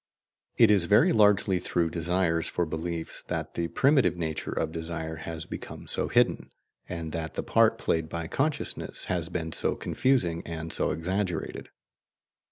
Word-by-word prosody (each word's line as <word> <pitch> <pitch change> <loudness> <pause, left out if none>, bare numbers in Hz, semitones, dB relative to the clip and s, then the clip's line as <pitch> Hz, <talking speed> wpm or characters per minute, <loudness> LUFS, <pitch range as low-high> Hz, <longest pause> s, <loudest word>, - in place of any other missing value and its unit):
It 115 -3 +7
is 100 -4 +4
very 105 +3 +5
largely 105 -3 +4
through 85 -2 0
desires 85 -1 0
for 90 - -1
beliefs 80 +1 -3
that - - -3
the 85 - -1
primitive 135 - +3
nature 80 -3 -3
of 80 - -1
desire 80 -1 -5
has 80 -1 -6
become - - -8
so - - +2
hidden, - - +2 0.4
and 85 -3 -4
that 80 0 -4
the - - -2
part - - +3
played 80 -1 -1
by 85 0 -4
consciousness 140 - -2
has 85 -2 -1
been 85 -2 -3
so - - -1
confusing 90 -11 +1
and 80 -1 -6
so - - 0
exaggerated. 90 +1 -2
85 Hz, 155 wpm, -28 LUFS, 80-95 Hz, 0.4 s, It